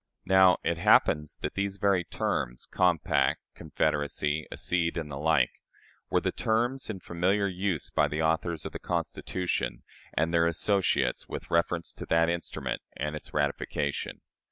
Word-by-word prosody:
Now, 95 Hz, -2 st, +6 dB
it 85 Hz, -1 st, 0 dB
happens 75 Hz, -2 st, +3 dB
that -, -, -2 dB
these 100 Hz, 0 st, -2 dB
very 100 Hz, -3 st, +2 dB
terms 60 Hz, -6 st, -2 dB
"compact," 90 Hz, -5 st, +2 dB
"confederacy," 75 Hz, 0 st, -1 dB
"accede," 85 Hz, -1 st, 0 dB
and 80 Hz, -3 st, -4 dB
the 70 Hz, -, -5 dB
like 75 Hz, -5 st, +3 dB, 0.6 s
were -, -, +3 dB
the -, -, -1 dB
terms 120 Hz, +4 st, 0 dB
in 100 Hz, -4 st, -4 dB
familiar 95 Hz, +5 st, +1 dB
use 95 Hz, -3 st, -1 dB
by 75 Hz, -, +3 dB
the 75 Hz, +2 st, -2 dB
authors 80 Hz, +1 st, 0 dB
of -, -, -4 dB
the -, -, -6 dB
Constitution 90 Hz, -1 st, -2 dB, 0.3 s
and 80 Hz, +2 st, +1 dB
their 85 Hz, 0 st, +4 dB
associates 95 Hz, +4 st, +1 dB
with -, -, -7 dB
reference 85 Hz, 0 st, +1 dB
to -, -, -8 dB
that 80 Hz, 0 st, +3 dB
instrument 85 Hz, 0 st, -3 dB, 0.2 s
and 75 Hz, +1 st, -2 dB
its 75 Hz, -, -7 dB
ratification. 70 Hz, 0 st, -2 dB
85 Hz, 150 wpm, -28 LUFS, 75-95 Hz, 0.6 s, Now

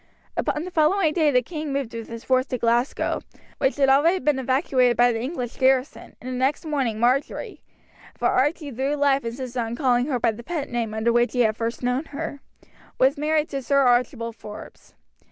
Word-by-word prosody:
Upon 300 Hz, -, -1 dB
the 365 Hz, -, -7 dB
following 320 Hz, +1 st, +2 dB
day 315 Hz, -3 st, +3 dB
the 250 Hz, -3 st, +3 dB
king 305 Hz, 0 st, -5 dB
moved 275 Hz, -4 st, -3 dB
with 230 Hz, -1 st, -6 dB
his 230 Hz, 0 st, -8 dB
force 255 Hz, 0 st, +2 dB
to 255 Hz, -, -2 dB
Glasgow, 235 Hz, +3 st, 0 dB, 0.4 s
which 265 Hz, -, +1 dB
had 275 Hz, -1 st, +3 dB
already 295 Hz, +7 st, +4 dB
been 300 Hz, -6 st, 0 dB
evacuated 255 Hz, -1 st, +2 dB
by 245 Hz, 0 st, +5 dB
the 225 Hz, -1 st, -3 dB
English 250 Hz, -3 st, -4 dB
garrison, 260 Hz, +1 st, +1 dB
and 250 Hz, -, -10 dB
the -, -, -3 dB
next 265 Hz, +6 st, 0 dB
morning 265 Hz, -8 st, -1 dB
Marjory 250 Hz, +4 st, 0 dB, 0.6 s
for -, -, +1 dB
Archie 290 Hz, +2 st, 0 dB
through 270 Hz, +4 st, -1 dB
life 280 Hz, -1 st, +2 dB
insisted 245 Hz, +1 st, -5 dB
upon 230 Hz, 0 st, -2 dB
calling 250 Hz, -2 st, +2 dB
her 260 Hz, -5 st, -1 dB
by 230 Hz, -1 st, +2 dB
the 220 Hz, +2 st, -9 dB
pet 305 Hz, +2 st, -4 dB
name 230 Hz, -3 st, -2 dB
under 225 Hz, +2 st, +1 dB
which 240 Hz, +1 st, +2 dB
he 250 Hz, -, +2 dB
had 215 Hz, -2 st, +2 dB
first 230 Hz, +2 st, -4 dB
known 250 Hz, +5 st, 0 dB
her 290 Hz, -1 st, -6 dB, 0.6 s
was 265 Hz, +3 st, +4 dB
married 305 Hz, +1 st, 0 dB
to 275 Hz, -1 st, -3 dB
Sir 275 Hz, +2 st, +2 dB
Archibald 240 Hz, -2 st, +1 dB
Forbes. 210 Hz, -2 st, -12 dB
260 Hz, 200 wpm, -24 LUFS, 240-290 Hz, 0.6 s, by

